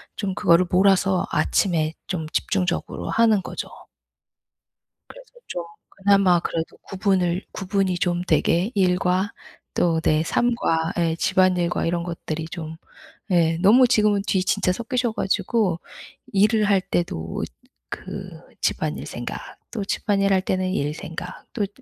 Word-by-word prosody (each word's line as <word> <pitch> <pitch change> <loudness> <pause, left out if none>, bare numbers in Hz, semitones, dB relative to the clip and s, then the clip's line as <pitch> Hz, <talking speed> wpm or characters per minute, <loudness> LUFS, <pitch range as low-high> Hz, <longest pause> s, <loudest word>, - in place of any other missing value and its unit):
좀 195 -3 -2
그거를 185 -3 +4
몰아서 190 0 +3
아침에 160 -5 +1
좀 160 -4 -3
집중적으로 180 +3 -1
하는 220 -4 +3
거죠. - - -5 1.4
그래서 - - -14 0.2
좀 175 - -4 0.3
그나마 195 -3 +3
그래도 165 -1 -4
구분을 190 -2 0
구분이 190 -1 -1
좀 175 -1 0
되게 175 +8 +2
일과 185 0 +2 0.4
또 165 -2 +2
내 155 0 +2
삶과 165 -7 0
예 165 -1 +1
집안일과 180 0 +2
이런 170 0 0
것들이 165 -2 -4
좀 160 -2 -6 0.6
예 165 -2 +3
너무 245 +6 +6
지금은 210 -4 +3
뒤 185 -2 +2
진짜 180 - +1
섞이셔 240 +1 -1
가지고 195 -3 0 0.5
일을 210 +2 +4
할 200 -2 +3
때도 80 - -3 0.5
그 - - -6 0.3
집안일 - - -1
생각, - - -5 0.3
또 200 - -3
집안일할 195 -2 +1
때는 185 0 -1
일 150 -5 -1
생각 165 +1 -8
또 215 - -1
그 - - -1
185 Hz, 260 characters per minute, -23 LUFS, 170-200 Hz, 1.4 s, 너무